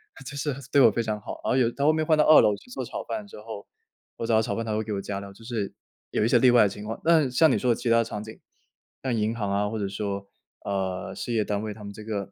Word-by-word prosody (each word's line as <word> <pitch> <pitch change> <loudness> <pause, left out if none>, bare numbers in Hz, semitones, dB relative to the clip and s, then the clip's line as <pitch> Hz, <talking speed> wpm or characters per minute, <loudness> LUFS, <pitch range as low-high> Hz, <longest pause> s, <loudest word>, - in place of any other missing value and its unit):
他 - - -12
就 145 - -7
是 140 -1 -2 0.2
对 140 - +5
我 - - +8
非 115 - -1
常 110 -1 -2
好。 - - -8
然 - - 0
后 - - +2
有 125 -3 +3
他 140 - -4
后 155 - +6
面 155 0 0
换 155 0 +3
到 150 - +5
2 155 - +8
楼 105 - +3
去 105 - -18
做 130 0 -4
炒 - - -5
饭 210 -2 -5
之 - - -12
后， 110 -2 -8 0.5
我 - - -3
找 115 - +3
他 110 - +5
炒 - - -2
饭 115 - -3
他 110 -1 -2
会 110 - -1
给 110 - -4
我 100 - -2
加 100 0 -4
料， 100 0 -9
就 115 - -16
是， 110 -4 -3 0.4
有 - - +1
一 - - +3
些 - - +5
例 130 -2 +6
外 120 -2 +6
的 105 - +3
情 105 +2 -8
况。 110 +1 -5
那 160 -5 +4
像 145 +5 +4
你 - - +2
说 125 - +2
的 - - +3
其 120 +1 -3
它 115 0 +5
场 105 -2 -6
景， 110 +1 -11 0.6
像 130 -3 0
银 110 +1 0
行 105 -4 -2
啊 100 +1 +1
或 110 +1 -4
者 100 - -1
说， 100 0 -4 0.4
呃， 95 -2 -2
事 120 - -4
业 110 -2 +2
单 105 -1 -1
位 110 -1 -4
他 105 0 -12
们 100 - -7
这 110 - -10
个 100 -2 -4
110 Hz, 335 characters per minute, -26 LUFS, 105-125 Hz, 0.6 s, 我